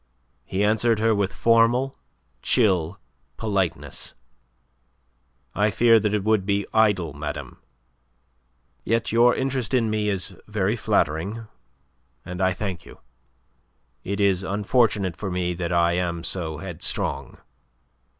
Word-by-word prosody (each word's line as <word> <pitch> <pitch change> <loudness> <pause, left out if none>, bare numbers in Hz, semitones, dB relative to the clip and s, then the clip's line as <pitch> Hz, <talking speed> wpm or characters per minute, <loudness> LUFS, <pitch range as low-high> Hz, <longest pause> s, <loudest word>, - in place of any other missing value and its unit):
He 95 +7 -2
answered 110 +2 +3
her 110 +1 +2
with 100 -2 0
formal, 115 +4 +3 0.5
chill 95 -7 +2 0.4
politeness. 100 -5 -3 1.4
"I 105 +1 +2
fear 115 +2 +5
that 105 0 0
it 105 - -1
would 110 -2 +2
be 100 0 0
idle, 105 -8 +2
madame. 75 -2 -6 1.2
Yet 115 +1 0
your 120 +2 +5
interest 130 -2 -1
in 115 -3 +1
me 105 -1 0
is 95 -3 -2
very - - 0
flattering, 95 +10 -1 0.8
and 90 +1 -6
I 95 0 +3
thank 95 -2 -4
you. - - -14 1.0
It 100 +2 -3
is 100 -2 +2
unfortunate 100 -1 +1
for 100 - -5
me 90 -1 -1
that 85 -1 -4
I 85 0 +3
am 85 -1 -2
so 80 -5 -2
headstrong." 85 -1 -3
100 Hz, 120 wpm, -24 LUFS, 90-110 Hz, 1.4 s, fear